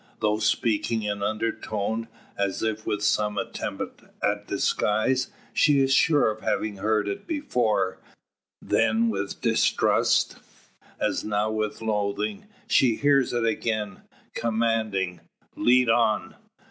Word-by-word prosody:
Though 105 0 +1
speaking 110 +1 0
in 105 -1 -2
undertone, 110 +1 -2 0.3
and 100 0 +1
as 95 - -5
if 110 -1 -2
with 105 0 -1
some 105 0 +1
attempt - - -5 0.2
at 105 0 0
disguise, 110 +5 +1 0.2
she 145 -2 +4
is 135 0 +3
sure 145 -5 +4
of 110 0 -9
having 105 -2 -1
heard 105 +1 0
it 100 - -5
before; 120 - 0 0.6
then 115 +1 +2
with 100 -2 -4
distrust, - - +2 0.6
as - - 0
now 105 0 0
with 110 0 -3
loathing. 110 - -2 0.2
She 120 -4 +4
hears 140 -1 +3
it 120 -1 0
again, 110 -3 -2 0.3
commanding: 110 -5 0 0.4
"Lead 125 0 +4
on!" 115 -2 +2
110 Hz, 120 wpm, -25 LUFS, 105-115 Hz, 0.6 s, she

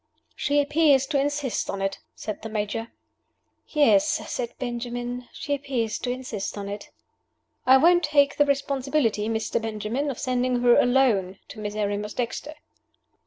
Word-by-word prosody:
"She 290 0 +1
appears 290 -2 +4
to 280 0 0
insist 285 -3 -1
on 195 - -3
it," 195 0 -2 0.2
said 215 - -6
the 225 - -6
Major. 215 +1 -2 0.8
"Yes," 225 -11 +4 0.3
said 240 -2 -3
Benjamin. 245 0 -4
"She 290 - -4
appears 265 -6 -2
to - - -3
insist 245 -6 -4
on 200 -1 -5
it." 205 +1 -7 0.8
"I 260 +1 +8
won't 345 +5 +5
take 285 -1 +3
the 290 - +5
responsibility, 270 -5 0
Mr. 225 +1 -1
Benjamin, 225 +6 -2
of 265 - -4
sending 250 -1 0
her 240 -1 +6
alone 235 -8 +3
to - - -9
Miserrimus 210 0 -3
Dexter." 250 +5 -3
245 Hz, 145 wpm, -25 LUFS, 215-280 Hz, 0.8 s, I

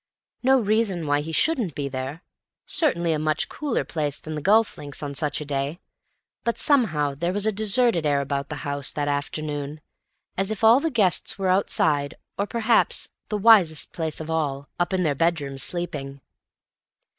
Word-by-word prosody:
No 265 +1 +4
reason 210 -6 0
why 145 0 +1
he 160 +2 -6
shouldn't 235 - +1
be 140 -1 -2
there; 135 +5 -5 0.4
certainly 170 - +1
a 155 - -1
much 155 0 0
cooler 290 -5 -2
place 150 -3 -2
than 155 - -7
the 150 - -4
golf 215 +6 +3
links 145 0 -7
on 145 -1 -4
such 145 +1 -2
a 150 - -6
day; 140 +3 -3 0.6
but 235 - -1
somehow 170 - +2
there 170 +6 -2
was 205 +2 0
a 220 - +2
deserted 215 -2 +3
air 145 -2 +2
about 140 0 -3
the 150 - -4
house 140 -1 -1
that 145 -2 -2
afternoon, 145 +1 -3 0.6
as 195 +1 0
if 220 0 -4
all 225 +3 +7
the 325 +3 -1
guests 205 - +1
were 190 -2 -1
outside, 155 -6 +1 0.2
or—perhaps 225 +3 +1 0.2
the 210 - -1
wisest 195 -7 +4
place 160 -2 -3
of 160 - -6
all—up 155 +2 -2
in 185 -1 +1
their 150 -4 +1
bedrooms, 140 -3 -1
sleeping. 140 -6 -3
160 Hz, 170 wpm, -24 LUFS, 145-210 Hz, 0.6 s, all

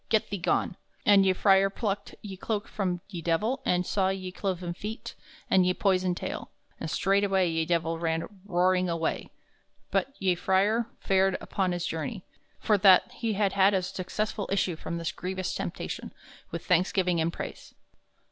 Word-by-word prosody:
Get 220 -2 +1
thee 200 - -2
gone!" 175 - 0 0.3
And 200 -2 +6
ye 190 - +4
frere 195 0 +4
plucked 200 -1 -3
ye 200 -2 -6
cloake 210 +2 -3
from 180 -4 -2
ye 180 -5 -6
Divell 175 +11 0
and 180 0 +2
saw 190 0 +1
ye 190 -1 -3
cloven 180 -2 -3
feet 210 +5 -6 0.3
and 185 - +4
ye 180 0 +2
poyson 185 -2 +2
taile, - - -5 0.3
and 160 - -4
straightway 195 0 +2
ye 165 -1 0
Divell 165 -1 0
ran 165 -1 -1 0.2
roaring 185 -1 +2
away. 165 -1 -2 0.6
But 275 +1 0
ye 190 -2 +2
frere 200 +6 +2
fared 190 0 +2
upon 190 -3 -1
his 175 -1 -2
journey, 180 +5 -4 0.3
for 210 -2 +2
that 185 -1 +6
he 230 -2 -2
had 200 -1 +1
had 195 0 +4
a 185 - +1
successful 200 +3 -3
issue 195 -3 +1
from 170 +1 -5
this 165 -1 -2
grevious 185 0 -4
temptation, - - -5 0.4
with - - -6
thanksgiving 180 -1 +2
and 165 +1 +1
prayse. - - -8
190 Hz, 165 wpm, -28 LUFS, 175-200 Hz, 0.6 s, And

